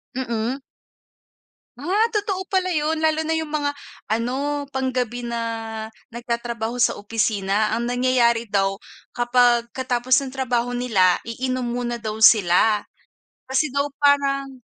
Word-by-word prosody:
Mm. 240 0 -2 1.2
Ah 375 - +1
totoo 400 -3 -1
pala 370 -1 +2
yun? 315 -1 0
Lalo 315 0 +1
na 320 - 0
yung 320 -1 -2
mga 290 -1 -1 0.3
ano 260 +6 -1
panggabi 250 -3 -2
na 235 0 -3 0.7
nagtatrabaho 235 0 -3
sa 245 - +3
opisina. 210 -1 0
Ang 235 +1 -1
nangyayari 245 -2 +2
daw 195 -2 0 0.3
kapag 240 -1 +3
katapos 255 +1 +1
ng 275 - -5
trabaho 245 -2 0
nila 195 -8 +3
iinom 255 +2 -3
muna 240 0 -2
daw 220 -2 -4
sila. 210 0 +5 0.6
Kasi 265 +2 +1
daw 280 +1 +1
parang 275 -2 +2
245 Hz, 120 wpm, -22 LUFS, 230-280 Hz, 1.2 s, sila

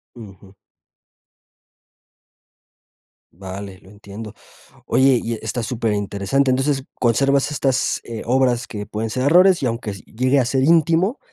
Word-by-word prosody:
Ujú. 100 -4 -13 2.8
Vale, 95 +1 -8
lo 95 - -18
entiendo. 105 +1 -10 0.5
Oye, 130 -2 +3
y 115 - -3
e - - -6
está 115 +2 -3
súper 115 -1 -2
interesante. 105 +6 0
Entonces, 135 +1 0 0.2
conservas 135 +4 +2
estas, 135 -2 0
eh, 115 -2 -6
obras 125 -1 +1
que 105 -2 -7
pueden 110 +1 -4
ser 130 +3 -2
errores 180 +2 +5
y - - +1
aunque 115 -2 -3
s 100 -1 -9
llegue 130 +4 0
a 130 - +3
ser 130 +2 0
íntimo, 165 - +3
120 Hz, 140 wpm, -20 LUFS, 105-135 Hz, 2.8 s, errores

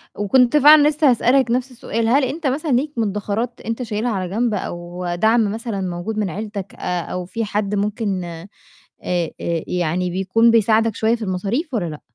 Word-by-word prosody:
وكنت 245 +7 +3
فعلًا 295 +1 +7
لسّه 300 -2 +3
هاسألك 250 +1 +3
نفْس 255 +1 -1
السؤال 230 -2 -3
هل 270 +4 +3
أنت 295 +3 -2
مثلًا 290 +3 -1
ليك 275 +5 +1
مدّخرات 215 +3 -2
أنت 230 +3 -3
شايلها 225 +1 -2
على 185 -3 -3
جنب، 225 +2 0
أو 175 -1 -5
دعم 220 +2 +2
مثلًا 220 -3 -4
موجود 180 +4 -4
من 205 -3 0
عيلتك، 200 +1 -6
آآ 180 -1 -2
أو 180 +1 -5
في 225 +4 -3
حد 205 0 -2
ممكن 205 -2 -1
آآ 170 +2 -8 0.6
آآ 175 -2 -1 0.4
يعني 180 +1 -1
بيكون 195 +6 +2
بيساعدك 225 0 +3
شوية 225 +1 +2
في 230 - -6
المصاريف 210 - -2
والّا 190 -6 0
لأ؟ 150 - -8
220 Hz, 180 wpm, -20 LUFS, 185-240 Hz, 0.6 s, فعلًا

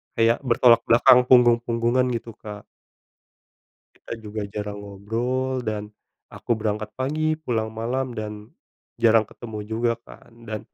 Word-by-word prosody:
kayak 115 0 +3
bertolak 120 -2 +5
belakang 125 +2 +7
punggung-punggungan 120 0 +3
gitu 115 0 -6
Kak. 105 -1 -9 1.3
Kita - - -11
juga 105 0 -5
jarang 105 0 -6
ngobrol 120 +6 -3
dan, 105 -1 -3 0.4
aku 120 - -2
berangkat 110 -1 -3
pagi 155 +4 -1
pulang 120 -8 -3
malam 125 +3 -3
dan, 105 0 -7 0.5
jarang 115 -2 +5
ketemu 110 0 -9
juga 115 +2 0
kan. - - -16 0.2
Dan 110 -1 -4
115 Hz, 125 wpm, -23 LUFS, 105-125 Hz, 1.3 s, belakang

